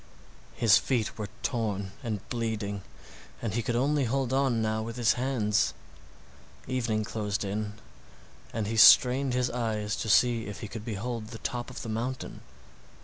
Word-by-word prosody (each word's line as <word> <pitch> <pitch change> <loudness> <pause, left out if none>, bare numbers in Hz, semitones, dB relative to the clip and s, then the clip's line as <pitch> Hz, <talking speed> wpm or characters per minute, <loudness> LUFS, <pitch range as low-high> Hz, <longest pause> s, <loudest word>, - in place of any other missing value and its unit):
His 110 -4 +5
feet 120 -5 -1
were 105 -1 -4
torn 105 -6 -1
and 110 -4 -4
bleeding, 110 -4 -2 0.6
and 110 -4 -3
he 120 - 0
could 115 +1 -2
only 140 +3 +2
hold 130 +1 0
on 135 -4 +2
now 110 0 0
with 115 +1 -5
his 120 -3 +3
hands. 120 -5 +1 0.9
Evening 115 -4 0
closed 105 -1 -2
in, 105 +1 -3 0.8
and 110 -1 -2
he 110 +2 -2
strained 125 +4 +7
his 125 -1 +1
eyes 110 -3 -1
to 110 - -3
see 115 0 +4
if 105 - -7
he 110 - -5
could 110 +1 -8
behold 115 0 -4
the 115 - -8
top 120 +2 -4
of 135 +2 -7
the 115 - -5
mountain. 120 +3 -4
115 Hz, 160 wpm, -28 LUFS, 105-125 Hz, 0.9 s, strained